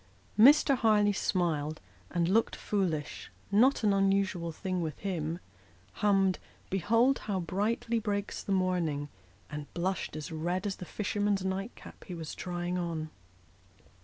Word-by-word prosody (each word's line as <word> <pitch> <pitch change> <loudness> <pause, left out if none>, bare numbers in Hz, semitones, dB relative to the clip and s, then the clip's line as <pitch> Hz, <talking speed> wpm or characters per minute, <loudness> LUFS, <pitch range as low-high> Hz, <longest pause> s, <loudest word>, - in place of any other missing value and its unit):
Mr. 275 +3 +7
Harleigh 210 -4 +3
smiled, 155 -6 0 0.3
and 170 -1 +1
looked 220 +5 +2
foolish 175 -8 -2 0.2
not 235 +6 +4
an 205 -2 +4
unusual 195 -3 +1
thing 185 +2 -3
with 155 -3 -3
him 170 -4 -2 0.6
hummed 195 -2 +3 0.2
" - - -30
Behold 230 +8 +3
how 200 -3 -2
brightly 210 +6 0
breaks 205 -2 -2
the - - -5
morning," 175 -6 0 0.4
and 150 -1 -6
blushed 185 0 -2
as 155 +1 -6
red 175 +5 -2
as 200 -2 -2
the 180 - -7
fisherman's 205 0 -1
night 195 +4 -3
cap - - -13
he 180 - -6
was 160 -2 -6
trying 175 0 -3
on. 160 -3 -3
190 Hz, 140 wpm, -30 LUFS, 170-205 Hz, 0.6 s, Mr